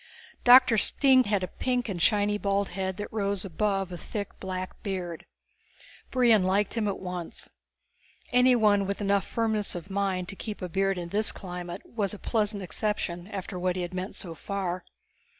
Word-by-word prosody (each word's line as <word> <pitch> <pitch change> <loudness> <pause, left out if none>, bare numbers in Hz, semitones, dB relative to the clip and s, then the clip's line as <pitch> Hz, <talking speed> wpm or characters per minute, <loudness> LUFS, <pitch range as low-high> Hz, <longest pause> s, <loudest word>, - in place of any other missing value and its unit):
Doctor 245 -3 +8
Stine 260 +1 +4
had 205 -2 +1
a - - -1
pink 250 +5 -1
and 185 -5 -3
shiny 205 +1 +3
bald 200 0 0
head 190 0 -3
that 205 - -6
rose 200 -2 0
above 195 +1 -1
a 175 - -5
thick 205 -2 -4
black 185 -1 -5
beard. 180 -5 -4 0.8
Brion 240 -5 +4
had 185 - +1
liked 200 +2 +1
him 225 -3 0
at 200 - -1
once. 180 -2 -6 0.8
Anyone 230 -6 +4
with 200 - -2
enough 200 -1 +1
firmness 220 -4 -1
of 175 +3 -7
mind 190 -2 -1
to - - -4
keep 210 +1 -6
a 180 - -4
beard 195 +2 +1
in 175 -1 -5
this 210 +4 +1
climate 180 -1 -7
was 210 -3 -1
a - - -9
pleasant 210 -2 -1
exception 180 -2 -2
after 195 -2 -5
what 180 0 0
he 180 - -2
had 175 +1 -5
met 185 +2 -4
so 170 -3 -6
far. 185 0 -3
200 Hz, 180 wpm, -28 LUFS, 185-210 Hz, 0.8 s, Doctor